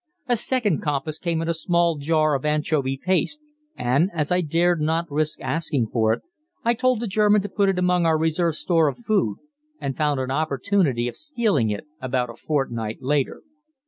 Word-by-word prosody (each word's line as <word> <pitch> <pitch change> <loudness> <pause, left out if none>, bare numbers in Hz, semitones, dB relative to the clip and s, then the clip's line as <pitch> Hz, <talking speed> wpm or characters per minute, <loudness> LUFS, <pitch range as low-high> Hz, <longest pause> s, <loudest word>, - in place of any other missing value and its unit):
A 245 - +3
second 225 - 0
compass 150 +1 -2
came 165 -2 -1
in - - -4
a 170 - +1
small 170 0 +1
jar 155 +1 +2
of 135 - -1
anchovy 150 -3 0
paste, 185 - 0 0.4
and, 135 +9 +2
as 150 -1 -1
I 180 0 +3
dared 170 +1 +1
not 160 +2 +1
risk 155 +1 -1
asking 150 -8 -1
for 110 -2 +3
it, 115 - -2 0.4
I 235 - +4
told 255 -1 +1
the 235 - -2
German 210 0 +3
to 205 - -4
put 200 -2 +2
it 190 - 0
among 180 -1 +2
our 160 -1 +3
reserve 160 +1 +1
store 165 -1 +2
of 140 - -2
food 215 - 0 0.4
and 135 -1 -3
found 150 -3 +1
an 130 0 -2
opportunity 140 -2 +1
of 120 - -5
stealing 225 - 0
it 105 +5 -4 0.2
about 125 -2 -1
a - - -13
fortnight 120 -7 -2
later. 140 0 0
160 Hz, 190 wpm, -23 LUFS, 135-180 Hz, 0.4 s, I